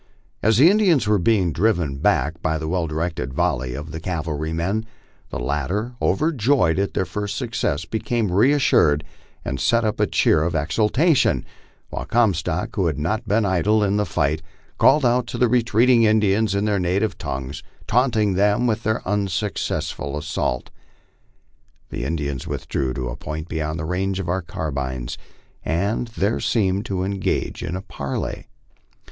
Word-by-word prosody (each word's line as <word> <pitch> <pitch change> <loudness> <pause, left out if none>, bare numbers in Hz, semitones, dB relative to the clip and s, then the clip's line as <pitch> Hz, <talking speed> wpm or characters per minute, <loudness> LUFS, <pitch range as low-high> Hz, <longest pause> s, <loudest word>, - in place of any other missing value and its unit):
As 110 0 +3
the 140 +6 +7
Indians 190 - +3
were 105 -1 +3
being 90 -3 +2
driven 85 -8 +1
back 80 +4 +1
by 80 0 0
the 80 0 -4
well 85 0 0
directed 80 -4 -3
volley 65 0 0
of 75 +3 -7
the 80 - -5
cavalrymen, 85 +5 -2 0.4
the - - -4
latter, 75 - -2
overjoyed 135 - +2
at 100 - -1
their 95 - +1
first 105 +1 -4
success, 75 +4 -2
became 110 +1 -1
reassured, 100 - +4 0.4
and 65 - -3
sent 115 -1 +2
up 105 - -1
a - - +3
cheer 75 - +3
of 85 +1 -1
exultation, 110 - +2 0.5
while - - -4
Comstock, 90 -7 0
who 95 -4 +1
had 75 -3 -1
not 105 +9 -2
been 105 +1 +2
idle 100 +3 +2
in 100 0 +1
the 105 - +1
fight, 80 0 0 0.4
called 145 0 +5
out 120 0 +2
to - - -5
the 125 - +3
retreating 120 +1 +4
Indians 110 -1 +3
in 100 +1 +1
their 105 -2 +1
native 95 +4 0
tongue, 65 0 -4 0.3
taunting 115 -5 +2
them 105 +5 +2
with 115 -2 0
their 110 -3 -2
unsuccessful 95 -7 -2
assault. 60 -4 -2 1.2
The - - -4
Indians 70 -5 -3
withdrew 65 -2 -2
to 65 -2 -3
a - - -5
point 80 +1 -6
beyond 80 -1 -3
the 80 - -4
range 95 +3 -1
of 95 - -4
our 95 +2 0
carbines, 65 -7 -4 0.4
and 100 +8 -1
there 110 -1 -1
seemed 100 -3 0
to 95 -2 -1
engage 100 0 -2
in 85 0 -3
a 95 - -5
parley. 70 -8 -5
95 Hz, 160 wpm, -22 LUFS, 80-110 Hz, 1.2 s, the